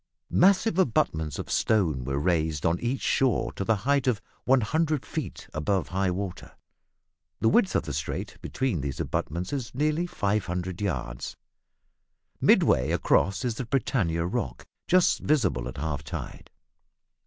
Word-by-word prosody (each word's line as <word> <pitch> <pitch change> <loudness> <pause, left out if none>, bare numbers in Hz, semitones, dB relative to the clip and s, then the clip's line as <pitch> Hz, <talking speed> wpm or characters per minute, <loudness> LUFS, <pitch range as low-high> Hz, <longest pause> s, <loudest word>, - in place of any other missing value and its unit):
Massive 190 +1 +4
abutments 80 - +1
of - - -5
stone 85 - +2
were 70 +2 -2
raised 80 -2 0
on 85 +1 +2
each 125 +3 -2
shore 130 -4 +2
to - - -4
the 110 +3 +2
height 140 -1 +2
of 120 -5 +2 0.3
100 145 +4 +2
feet - - -5
above 90 +5 0
high 95 +1 0
water. 90 0 -5 0.9
The 110 - +3
width 200 - +3
of - - +2
the 75 - -5
strait 70 +2 -4
between 125 - -1
these 70 -1 -4
abutments 90 - -2
is 130 -4 -4
nearly 155 +5 +1
500 95 - -2
yards. - - -3 1.0
Midway 65 - +4
across 100 +6 +2
is 120 - 0
the 125 +3 -5
Britannia 100 -11 0
Rock, 65 -8 -3 0.2
just 185 0 +4
visible 95 - +1
at 65 +1 -7
half 70 -1 -3
tide. 70 - -7
95 Hz, 140 wpm, -27 LUFS, 80-130 Hz, 1.0 s, Massive